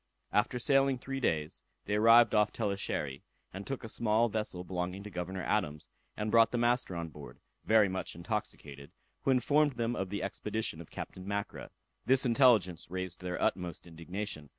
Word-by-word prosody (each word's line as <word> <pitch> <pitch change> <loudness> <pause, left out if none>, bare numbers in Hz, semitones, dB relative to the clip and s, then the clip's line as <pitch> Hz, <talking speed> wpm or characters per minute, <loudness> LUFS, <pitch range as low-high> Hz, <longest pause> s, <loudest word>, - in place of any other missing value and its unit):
After 105 +4 +2
sailing 135 +1 +3
three 135 +2 -5
days, 80 - -1 0.2
they 105 - -2
arrived 115 +2 +6
off 105 -1 +3
Tellechery, 85 -9 -3 0.3
and 95 +1 -7
took 135 -2 -4
a - - -5
small 110 +1 +1
vessel 105 -4 -3
belonging 90 +1 -4
to 105 - -9
Governor 90 +1 -4
Adams, 90 -4 -1 0.3
and 105 0 -2
brought 115 0 +6
the 120 - -2
master 120 -5 +1
on 85 -1 -4
board, 70 -5 -12 0.3
very 110 -2 +5
much 95 -2 -4
intoxicated, 70 -3 -5 0.3
who - - -1
informed 140 +3 +3
them 120 0 -1
of 95 -1 -3
the 100 -1 -3
expedition 105 -3 -3
of 85 - -12
Captain 95 +1 -8
Mackra. 100 0 -4 0.4
This 130 +1 +4
intelligence 115 - +3
raised 95 -1 -4
their 90 0 -4
utmost 90 -3 -1
indignation. 85 -1 -6
100 Hz, 170 wpm, -31 LUFS, 90-115 Hz, 0.4 s, arrived